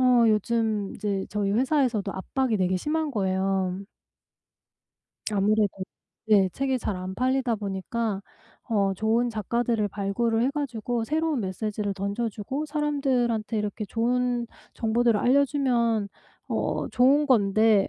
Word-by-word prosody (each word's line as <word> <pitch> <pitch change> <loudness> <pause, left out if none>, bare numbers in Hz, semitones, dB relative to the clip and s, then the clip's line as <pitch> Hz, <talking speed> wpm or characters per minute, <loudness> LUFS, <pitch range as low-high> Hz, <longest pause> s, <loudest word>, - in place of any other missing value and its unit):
어 250 -2 +5
요즘 215 -1 0
이제 200 -2 -2
저희 205 -1 -1
회사에서도 245 -4 +1
압박이 235 +5 -1
되게 185 -1 +1
심한 305 - -1
거예요. 190 -2 -1 1.5
아무래도 210 +1 +2 0.6
예. 200 -3 +5
책이 265 +6 -1
잘 210 -4 -3
안 185 +1 -5
팔리다 255 +1 +1
보니까 200 +1 -3 0.5
어 200 -4 +1
좋은 225 +4 +1
작가들을 225 0 -1
발굴을 220 +4 0
해 255 - +2
가지고 245 -5 -2
새로운 310 +1 0
메시지를 205 +1 -3
던져주고 210 +7 -3
사람들한테 265 -7 0
이렇게 210 +1 -3
좋은 240 +2 0 0.3
정보들을 230 0 +2
알려주면 245 -5 +2 0.4
어 - - -1
좋은 275 +4 +4
건데 215 -4 +4
225 Hz, 285 characters per minute, -26 LUFS, 200-250 Hz, 1.5 s, 어